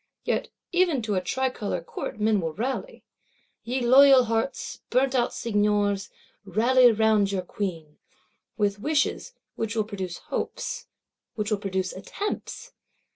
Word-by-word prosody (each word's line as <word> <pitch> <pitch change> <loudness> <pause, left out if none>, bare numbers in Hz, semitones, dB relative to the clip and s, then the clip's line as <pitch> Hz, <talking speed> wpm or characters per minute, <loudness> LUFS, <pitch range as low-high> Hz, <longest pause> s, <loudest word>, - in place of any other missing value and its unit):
Yet - - -1 0.2
even 345 -8 +2
to 215 -1 -1
a 185 - +1
tricolor 245 -2 -2
Court 190 - -6
men 210 -2 +2
will 165 -2 -3
rally. 265 - -4 0.6
Ye 250 +3 -2
loyal 265 +2 +7
hearts, 230 +3 -2
burnt 260 +2 +2
out 245 -2 +2
Seigneurs, 205 -2 0 0.3
rally 240 +6 +5
round 215 -2 +3
your 190 -2 -1
Queen! 165 -6 -5 0.6
With 205 -2 0
wishes; 300 - 0 0.2
which 225 0 -3
will 220 - +2
produce 190 -4 -5
hopes; - - -4 0.5
which 210 0 -2
will 210 - +1
produce 190 -2 -2
attempts! 400 - -5
220 Hz, 130 wpm, -26 LUFS, 200-260 Hz, 0.6 s, loyal